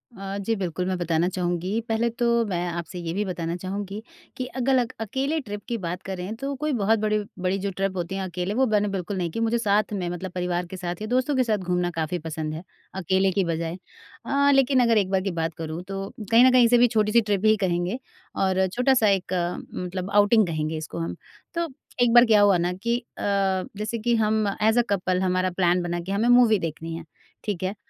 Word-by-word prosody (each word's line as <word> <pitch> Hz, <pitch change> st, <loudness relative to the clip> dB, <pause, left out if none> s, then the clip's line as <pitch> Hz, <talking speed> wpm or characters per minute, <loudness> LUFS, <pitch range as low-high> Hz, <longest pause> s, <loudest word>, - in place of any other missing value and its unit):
अ, 195 Hz, 0 st, -5 dB
जी, 200 Hz, +3 st, -1 dB
बिल्कुल 180 Hz, -3 st, -3 dB
मैं 185 Hz, -1 st, -1 dB
बताना 170 Hz, -1 st, +1 dB
चाहूँगी 180 Hz, +3 st, -1 dB
पहले 225 Hz, +1 st, +1 dB
तो 235 Hz, +1 st, -2 dB, 0.2 s
मैं 180 Hz, -4 st, -2 dB
आपसे 170 Hz, +1 st, -5 dB
ये 165 Hz, -1 st, -4 dB
भी 205 Hz, +3 st, 0 dB
बताना 170 Hz, -2 st, -3 dB
चाहूँगी 195 Hz, +3 st, -5 dB, 0.4 s
कि 255 Hz, -, -2 dB
अगलक 255 Hz, -1 st, +1 dB
अकेले 270 Hz, +8 st, -1 dB
ट्रिप 210 Hz, -7 st, -7 dB
की 235 Hz, -, -2 dB
बात 180 Hz, -2 st, -4 dB
करें 190 Hz, +2 st, -5 dB
तो 275 Hz, +4 st, -4 dB
कोई 305 Hz, 0 st, 0 dB
बहुत 220 Hz, -1 st, +2 dB
बड़ी 215 Hz, 0 st, +1 dB, 0.2 s
बड़ी 185 Hz, +1 st, 0 dB
जो 200 Hz, +1 st, -2 dB
ट्रिप 195 Hz, 0 st, -2 dB
होती 175 Hz, +2 st, -3 dB
है 195 Hz, -, -2 dB
अकेले 180 Hz, +2 st, -3 dB
वो 260 Hz, +4 st, +3 dB
मैंने 210 Hz, -2 st, +2 dB
बिल्कुल 195 Hz, 0 st, -3 dB
नहीं 175 Hz, -2 st, -1 dB
की। 230 Hz, -, -4 dB
मुझे 230 Hz, +1 st, +1 dB
साथ 210 Hz, -1 st, +1 dB
में 185 Hz, -3 st, -2 dB
मतलब 175 Hz, +1 st, -5 dB
परिवार 180 Hz, -1 st, -2 dB
के 190 Hz, -, -8 dB
साथ 175 Hz, 0 st, -5 dB
या 215 Hz, -, -3 dB
दोस्तों 255 Hz, +4 st, +1 dB
के 260 Hz, -, +3 dB
साथ 220 Hz, -3 st, +1 dB
घूमना 180 Hz, -2 st, -1 dB
काफ़ी 160 Hz, +3 st, -1 dB
पसंद 155 Hz, -1 st, -4 dB
है, 160 Hz, +2 st, -6 dB, 0.3 s
अकेले 190 Hz, +1 st, +1 dB
की 195 Hz, +1 st, +1 dB
बजाय। 165 Hz, +1 st, -2 dB, 0.5 s
हाँ, 280 Hz, +1 st, +3 dB
लेकिन 270 Hz, -1 st, +4 dB
अगर 230 Hz, -2 st, +3 dB
एक 195 Hz, -3 st, +2 dB
बार 190 Hz, -1 st, +2 dB
की 195 Hz, 0 st, -2 dB
बात 165 Hz, -1 st, -2 dB
करूँ 160 Hz, +1 st, -5 dB
तो 195 Hz, 0 st, -4 dB, 0.2 s
कहीं 230 Hz, +2 st, +7 dB
न 260 Hz, -, +6 dB
कहीं 250 Hz, -2 st, +6 dB
से 240 Hz, +1 st, +5 dB
भी 245 Hz, +1 st, +6 dB
छोटी-सी 220 Hz, 0 st, +3 dB
ट्रिप 205 Hz, -2 st, -1 dB
ही 215 Hz, 0 st, +6 dB
कहेंगे 180 Hz, +3 st, -1 dB, 0.4 s
और 190 Hz, 0 st, +2 dB
छोटा-सा 245 Hz, +3 st, +2 dB
एक 190 Hz, -1 st, 0 dB, 0.4 s
मतलब 180 Hz, +1 st, -4 dB
आउटिंग 205 Hz, +1 st, +5 dB
कहेंगे 155 Hz, -1 st, -2 dB
इसको 155 Hz, +1 st, -6 dB
हम। 165 Hz, -, -3 dB, 0.4 s
तो 340 Hz, -1 st, -1 dB, 0.3 s
एक 240 Hz, -1 st, +4 dB
बार 240 Hz, 0 st, +8 dB
क्या 215 Hz, -3 st, +5 dB
हुआ 200 Hz, -2 st, +5 dB
ना 175 Hz, +1 st, 0 dB
कि 235 Hz, +6 st, -1 dB, 0.2 s
अ, -, -, -7 dB, 0.6 s
जैसे 215 Hz, +2 st, -3 dB
कि 235 Hz, +2 st, +1 dB
हम 215 Hz, -1 st, +1 dB
एज़ 220 Hz, +3 st, +4 dB
अ -, -, +6 dB
कपल 185 Hz, -2 st, 0 dB
हमारा 185 Hz, 0 st, +1 dB
प्लान 180 Hz, -1 st, +3 dB
बना 175 Hz, 0 st, -2 dB
के 175 Hz, +3 st, -6 dB
हमें 215 Hz, +5 st, +1 dB
मूवी 240 Hz, -4 st, +6 dB
देखनी 165 Hz, 0 st, -5 dB
है। 165 Hz, -, -7 dB, 0.4 s
ठीक 200 Hz, -4 st, -3 dB
है? 190 Hz, +2 st, -2 dB
195 Hz, 225 wpm, -25 LUFS, 180-225 Hz, 0.6 s, बार